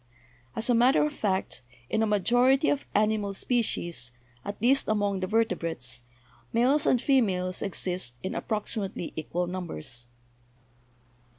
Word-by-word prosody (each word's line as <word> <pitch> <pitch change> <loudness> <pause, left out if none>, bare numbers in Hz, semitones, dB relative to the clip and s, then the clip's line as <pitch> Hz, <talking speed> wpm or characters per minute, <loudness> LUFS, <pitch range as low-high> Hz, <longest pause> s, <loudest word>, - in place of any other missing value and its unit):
As 225 - 0
a 245 - +4
matter 250 +5 +5
of 300 - -2
fact, 190 - -1 0.3
in 220 - 0
a 220 - +2
majority 245 +7 +3
of 290 - -1
animali 210 -1 +1
species, 175 - -1 0.3
at 205 - -6
least 260 +5 +4
among 205 -2 +1
the 185 - -2
vertebrates, 165 - -1 0.5
males 260 +6 +3
and 250 - +4
females 190 -10 +1
exist 180 -9 -2
in 190 - -3
approximately 210 -4 -3
equal 170 +3 -2
numbers. 140 - -5
205 Hz, 125 wpm, -28 LUFS, 180-235 Hz, 0.5 s, matter